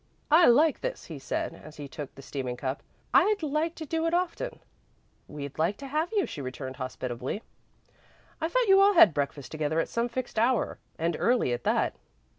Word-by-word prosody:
"I 330 +3 +7
like 290 +6 +4
this," - - -4
he 160 -4 -8
said, 135 - -3
as 155 +1 -13
he 145 -1 -6
took 145 -1 -8
the 135 - -12
steaming 130 -3 -4
cup. 130 +2 -3 0.3
"I'd 420 -4 +4
like 310 +3 0
to 315 - -6
do 325 +2 -1
it 335 - +1
often." 365 +8 -2 0.7
"We'd 145 -1 -7
like 170 +6 +1
to 280 - -8
have 310 +5 -1
you," 415 -4 +2
she 145 - -7
returned, 130 0 -6
hospitably. 130 - -4 1.0
"I 320 - +1
thought - - +2
you 390 0 +7
all 400 +1 +6
had 215 - +8
breakfast 140 -1 -3
together 155 0 -1
at - - -1
some 235 +1 -1
fixed 245 -2 -3
hour, 240 0 +1 0.2
and 165 0 0
early 235 - +2
at 120 - -5
that." - - +2
210 Hz, 195 wpm, -28 LUFS, -, 1.0 s, had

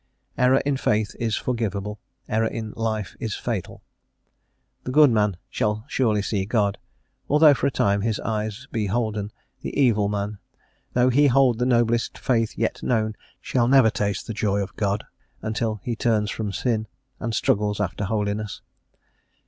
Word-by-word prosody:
Error 130 +2 +4
in 140 -1 +1
faith 105 -4 0
is 115 -3 0
forgiveable; 105 -4 -2 0.3
error 110 +1 +1
in 110 -1 -5
life 110 -3 -2
is 110 -3 -3
fatal. 110 -7 -4 1.0
The - - -5
good 150 -1 +6
man 105 -4 +1
shall 105 +1 -1
surely 110 -6 +1
see 100 -2 -1
God, 100 -1 0 0.5
although, 150 +1 +7
for 140 - 0
a - - 0
time, 100 -4 +1
his 110 0 -1
eyes 110 +2 -3
be 110 -3 -1
holden; 105 -1 -1 0.3
the - - -4
evil 110 -7 +3
man, 105 0 -3 0.5
though 125 +1 +4
he 145 +3 +5
hold 130 -3 +4
the 125 - +1
noblest 120 -2 +1
faith 115 -3 0
yet - - -1
known, 110 -3 0 0.2
shall 120 -2 +1
never 130 -4 +6
taste 100 -2 -2
the 115 - -4
joy 100 -1 0
of 95 - -9
God, 100 0 -1 0.4
until 110 0 -1
he 120 - -2
turns 110 -3 +1
from 105 -3 -3
sin, 110 +3 -1 0.3
and 115 0 -2
struggles 105 0 +1
after 100 0 -2
holiness. 105 0 -2
110 Hz, 160 wpm, -24 LUFS, 105-120 Hz, 1.0 s, although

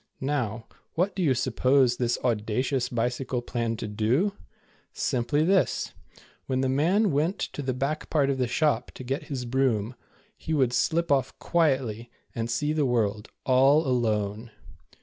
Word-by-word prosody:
Now, 125 -6 -2 0.3
what 180 +3 0
do 190 - -2
you 140 -7 +3
suppose 130 +1 +2
this 120 -1 0
audacious 125 +3 0
bicycle 125 +1 -2
planned 115 -2 -2
to 110 - -4
do? 115 - +1 0.6
Simply 140 +5 0
this. 190 +1 +1 0.5
When 130 -1 0
the 130 - +1
man 175 +10 +2
went 155 +7 0
to - - -4
the 130 -2 -2
back 140 +4 -2
part 140 -3 +2
of 135 - -2
the 125 - +1
shop 145 -1 +1
to - - -8
get 135 +5 -3
his 130 -4 -4
broom, 120 -3 0 0.4
he 160 - -3
would 130 -4 +2
slip 170 +5 +1
off 135 -3 +1
quietly, 130 -9 0 0.2
and 115 0 -3
see 150 +6 0
the 150 -3 +1
world, 110 -3 0 0.2
all 135 +4 +4
alone. 110 -3 -1
130 Hz, 155 wpm, -26 LUFS, 120-145 Hz, 0.6 s, all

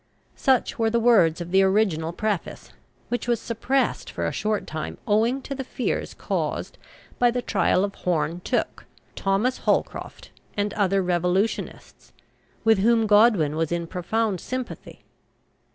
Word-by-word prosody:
Such 260 -3 +1
were 225 -1 +3
the 235 +1 +1
words 200 -9 +4
of 175 0 -6
the 190 +1 +5
original 190 -5 +2
preface, 205 0 -3 0.4
which 245 -1 -2
was 240 -2 +1
suppressed 250 +4 -1
for - - -3
a - - 0
short 215 -1 -1
time 155 -1 -5
owing 230 +6 +2
to 275 - -5
the 270 0 -4
fears 255 -1 -3
caused - - -3 0.4
by 245 - +5
the 245 +1 -2
trial 185 - +2
of 200 0 -2
Horne 170 -2 -1
Tooke, - - -2 0.3
Thomas 200 +6 0
Holcroft - - -2 0.3
and 205 0 0
other 195 -2 +1
revolutionists, 180 +4 -2 0.5
with 220 -2 +4
whom 225 +2 +3
Godwin 205 -8 +4
was 160 0 -1
in 170 0 -1
profound 190 +3 -1
sympathy. 255 -1 -6
205 Hz, 145 wpm, -24 LUFS, 180-235 Hz, 0.5 s, the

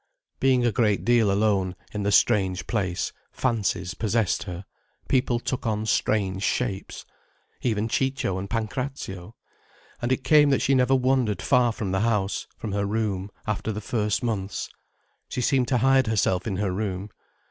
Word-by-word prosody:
Being 130 -2 +3
a 120 - +3
great 105 -5 +1
deal 115 -3 +4
alone, 100 -2 +1 0.2
in 105 - -3
the 100 0 0
strange 95 -5 +3
place, 95 -6 -2 0.2
fancies 110 -7 -1
possessed 110 -2 0
her, 90 0 -7 0.4
people 125 -2 +2
took 125 -1 -3
on 110 0 -1
strange 100 -3 0
shapes. 100 -2 -2 0.6
Even 110 -2 0
Ciccio 130 -6 -1
and 100 +1 -6
Pancrazio. 115 -4 -4 0.7
And 120 +1 -1
it 130 0 0
came 150 +1 +6
that 135 - +2
she 135 - +3
never 130 0 +4
wandered 130 -5 +1
far 125 -3 +3
from 105 -4 -4
the 95 - +1
house, 105 -3 0
from 110 - -5
her 100 0 -1
room, 100 -2 -1 0.2
after 105 +1 -2
the 105 - -4
first 105 +1 -1
months. 100 -5 -2 0.6
She - - -4
seemed 130 0 +2
to 125 - +2
hide 135 +1 +4
herself 100 -3 +1
in 100 - -1
her 100 0 -1
room. 100 0 -3
110 Hz, 160 wpm, -25 LUFS, 100-125 Hz, 0.7 s, came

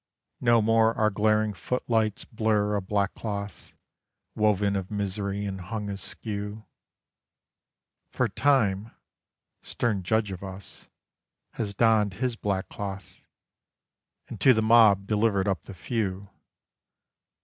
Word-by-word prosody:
No 120 -2 +4
more 115 +1 +3
our 110 0 +3
glaring 110 +1 +2
footlights 110 -2 -1
blurr 105 -2 0
a 100 - 0
back 100 +1 -1
cloth 100 -3 -6 0.6
Woven 105 -1 +2
of 95 -1 -3
misery 100 0 -3
and 95 -1 -5
hung 105 +3 -4
askew; 105 +2 -5 1.4
For - - 0
Time, 115 -7 +1 0.7
stern 110 -5 -1
judge 105 +2 0
of 95 - -7
Us, 95 0 -9 0.6
has 100 -3 -4
donned 110 -3 +3
his 125 +3 -1
black 100 -4 -2
cloth, 100 -1 -8 1.0
And - - -9
to 130 - +6
the 110 - +1
Mob 110 -4 +6
delivered 105 -2 +1
up 95 -6 0
the - - -11
Few 100 -2 -3
105 Hz, 115 wpm, -27 LUFS, 100-110 Hz, 1.4 s, to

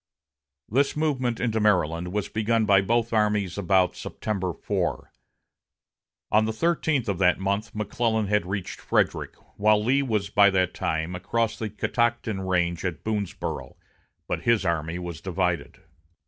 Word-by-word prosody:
This 140 +6 +1
movement 130 -7 0
into 115 -2 0
Maryland 90 -4 +1
was 105 0 -1
begun 110 +1 +1
by 100 -2 +5
both 115 +3 0
armies 105 -4 +1
about 95 -2 +2
September 95 -4 -3
4. - - -3 1.2
On 110 +1 +4
the 110 - -1
thirteenth 155 -1 0
of 100 -3 -1
that 90 -2 +4
month 100 +4 -2
McClellan 110 +1 0
had 105 -2 +1
reached 100 -1 -4
Frederick, - - 0 0.2
while 105 +1 +4
Lee 135 +5 +3
was 105 -6 -1
by 100 -1 +6
that 95 -2 +1
time 80 +2 -2
across 115 +5 -1
the 110 - -3
Catoctin 120 -2 -1
range 90 -2 0
at 90 -4 -3
Boonsboro', 105 -4 -3 0.5
but - - -2
his 115 -4 +2
army 85 0 -1
was 85 -3 -6
divided. 90 -4 -2
105 Hz, 145 wpm, -25 LUFS, 90-115 Hz, 1.2 s, by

